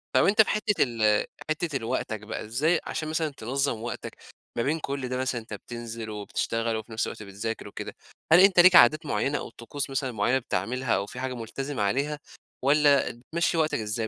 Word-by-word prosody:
طَب - - +5
أنت 210 +3 +6
في 215 - +2
حتة 210 -1 +2
ال 110 -4 +2 0.2
حتة 155 0 -1
ال 125 - -9
وقتك 115 -2 -2
بقى 105 0 -6
إزاي 145 +10 +1
عشان 155 - -3
مثلًا، 160 0 0
تنظم 130 -2 -2
وقتك 120 +1 -6 0.4
ما 115 - +1
بين 155 +5 0
كل 140 -3 -4
ده 125 - -2
مثلًا، 130 -2 -1
أنت 110 - -11
بتنزل 115 -1 -7
وبتشتغل، 115 +2 -2
وفي 110 +1 -6
نفس 110 - -1
الوقت - - -7
بتذاكر 105 +3 -5
وكده. - - -7 0.4
هل 170 - +9
أنت 190 -1 +6
ليك 180 +1 +8
عادات 155 +4 +7
مُعينة 145 0 0
أو - - -6
طقوس 125 +5 -4
مثلًا 135 -1 -2
مُعينة 120 +4 +1
بتعملها 125 +3 -1
أو 100 - -1
في 125 - -8
حاجة 130 0 -3
مُلتزم 130 +4 -5
عليها؟ 140 +9 0 0.5
والّا 145 -1 +4
بتمشي 165 +9 -2
وقتك 155 -5 +1
إزاي 110 +1 -2
130 Hz, 195 wpm, -27 LUFS, 115-150 Hz, 0.5 s, هل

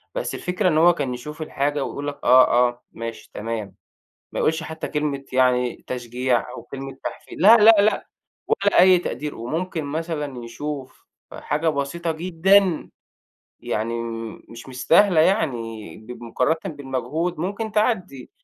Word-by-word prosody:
بس - - -3
الفكرة 180 +2 -1
إن 155 - +1
هو 175 +2 +6
كان 140 -6 -3
يشوف 150 +6 -8
الحاجة 145 -1 -1
ويقول 145 0 -5
لك: 145 0 -5
"آه، 125 -1 +6
آه، 120 0 -12
ماشي، 115 0 -7
تمام." 110 -2 -5 0.6
ما - - -4
يقولش 160 +1 +1
حتّى 160 0 -6
كلمة 150 -3 -2
يعني 125 -1 +1
تشجيع 125 0 -1
أو 115 - -8
كلمة 135 +2 -8
تحفي - - -7
لأ، 215 +7 +7
لأ، 225 +1 +8
لأ 210 +2 +1 0.4
ولا 200 -2 +3
أي 185 0 +7
تقدير. 150 -3 -4
وممكن 160 +7 -3
مثلًا 150 -4 -4
يشوف 135 +1 -7 0.3
حاجة 155 +2 -2
بسيطة 160 +3 -2
جدًا 180 +2 +2 0.7
يعني 115 +2 -2
م 115 -1 -5
مش 115 +3 -11
مستاهلة 165 +7 +4
يعني 120 - -1
ب 120 +3 -11
مقارنةً 125 +7 0 0.2
بالمجهود 145 +5 -3
ممكن 205 +6 -3
تعدّي. 190 - -1
145 Hz, 145 wpm, -23 LUFS, 125-170 Hz, 0.7 s, لأ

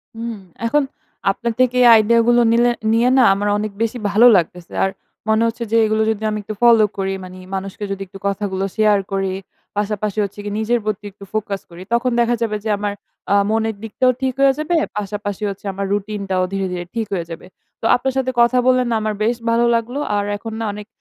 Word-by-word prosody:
হুম। 230 0 -4 0.3
এখন 290 +5 +2 0.5
আপনার 235 +3 -3
থেকে 250 -1 +3
এই - - +7
আইডিইয়া 230 +2 +4
গুলো 240 0 +5
নিলে 240 +1 +4 0.2
নিয়ে 235 +2 +3
না 255 - +6
আমার 205 +1 -2
অনেক 210 0 -3
বেশি 230 +2 0
ভালো 225 +4 +7
লাগতেছে। 175 0 -3
আর 195 - +2 0.4
মনে 220 +1 +3
হচ্ছে 235 +1 -3
যে - - +2
এগুলো 215 0 +1
যদি 220 0 -4
আমি 215 - -2
একটু 215 - -5
ফলো 230 -2 +6
করি 195 0 -1
মানে 185 0 -10 0.2
মানুষকে 195 +2 -5
যদি 195 0 -4
একটু 195 +2 -12
কথাগুলো 195 -1 -2
শেয়ার 210 -2 +4
করি। 195 -1 -1 0.4
পাশাপাশি 210 0 -2
হচ্ছে 200 +1 -6
কি - - -2
নিজের 235 +2 +1
প্রতি 210 0 -3
একটু 200 - -15
ফোকাস 205 -2 -2
করি, 170 +1 -11
তখন 240 +1 +2
দেখা 240 0 +3
যাবে 215 -2 0
যে 220 - -3
আমার 205 0 -2 0.4
আ - - +5
মনের 220 0 0
দিকটাও 255 +3 +2
ঠিক 260 -1 0
হয়ে 275 -1 +6
যাবে। 325 +3 0 0.2
পাশাপাশি 205 0 -4
হচ্ছে 195 +1 -8
আমার 195 +1 -3
রুটিনটাও 200 -2 -1
ধীরে, 195 0 -1
ধীরে 175 -1 -4
ঠিক 225 -2 -1
হয়ে 175 -3 -2
যাবে। 165 0 -8 0.4
তো - - -5
আপনার 265 +1 -1
সাথে 260 -1 0
কথা 235 +2 +4
বললে 255 0 +4
না 230 - +1
আমার 215 0 -1
বেশ 235 +2 +2
ভালো 235 +1 +3
লাগলো। 240 +5 -2 0.2
আর 205 - +1
এখন 225 +2 -7
না 225 - -2
অনেক 210 +1 -9
215 Hz, 210 wpm, -19 LUFS, 200-235 Hz, 0.5 s, এই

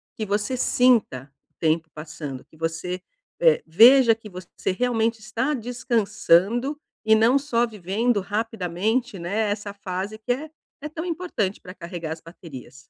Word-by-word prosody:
que 215 - -3
você 210 +5 -1
sinta 230 - +2 0.2
o - - -46
tempo 160 0 +1
passando, 150 -3 -7
que - - -23
você, 165 +3 -3 0.4
é, - - +5
veja 235 +8 +7
que 220 -1 -12
você 185 0 -5
realmente 230 +1 0
está 230 +7 -2
descansando 235 - +1 0.3
e 220 - +5
não 230 +5 +4
só 245 -4 +1
vivendo 210 +2 -1
rapidamente, 210 +1 -2
né. 205 +5 -1
Essa 205 0 -4
fase 200 +1 -5
que 220 +3 -3
é 290 +6 -2 0.3
é 300 - -4
tão 315 +1 -6
importante 335 - -2
para 180 - -11
carregar 170 -3 -6
as 160 - -12
baterias. 165 -6 -11
215 Hz, 150 wpm, -24 LUFS, 180-240 Hz, 0.4 s, veja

